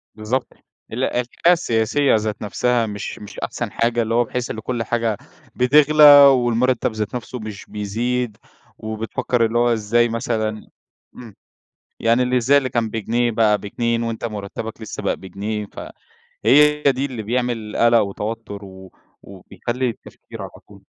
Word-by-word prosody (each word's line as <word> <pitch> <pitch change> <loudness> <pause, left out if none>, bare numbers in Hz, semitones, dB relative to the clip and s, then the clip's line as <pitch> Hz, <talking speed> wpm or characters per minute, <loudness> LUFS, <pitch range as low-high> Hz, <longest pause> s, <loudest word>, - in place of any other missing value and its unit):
بالضبط. 115 +4 -2 0.5
ال - - -2
الحالة 125 0 -1 0.3
السياسية 130 -3 +1
ذات 110 -1 -2
نفسها 115 +3 0
مش 105 -2 -6
مش 105 - -10
أحسن - - -4
حاجة، 120 0 0
اللي 115 0 -2
هو 120 +1 +4
بحيث 125 +1 -4
إن 110 - -5
كل 120 +1 -3
حاجة 115 -3 -1 0.4
بتغلى 150 +4 +4 0.2
والمُرتَّب 125 -1 +2
ذات 110 +1 -4
نفسه 125 +1 -6
مش 110 -2 -8
بيزيد 115 +3 -3 0.4
وبتفكّر 110 +2 -1
اللي 115 +1 -1
هو 120 0 +3
إزاي 115 +2 +1
مثلًا 110 -2 -3 0.5
إمم، 115 -5 -12 0.7
يعني 115 +2 +3
اللي 125 0 0
إزاي 130 +4 +4
اللي 130 -2 -1
كان 115 -2 -1
بجنيه 115 +2 0
بقى 110 -2 +2
ب2 115 +3 -2
وأنت 115 0 -4
مُرتَّبك 110 +1 -6
لسّه 110 - -6
بقى - - 0
بجنيه 105 +2 -5
ف - - -11 0.7
هي 150 +2 +5
دي 135 -1 +2
اللي 125 -6 -6
بيعمل 120 -2 -2
قَلَق 115 0 +5
وتوتُّر 105 0 -4
و 95 0 -13 0.3
وبيخلّي 120 +6 -4
التفكير 115 - -11
على - - -7 0.2
طول. - - -18
115 Hz, 150 wpm, -20 LUFS, 110-125 Hz, 0.7 s, هي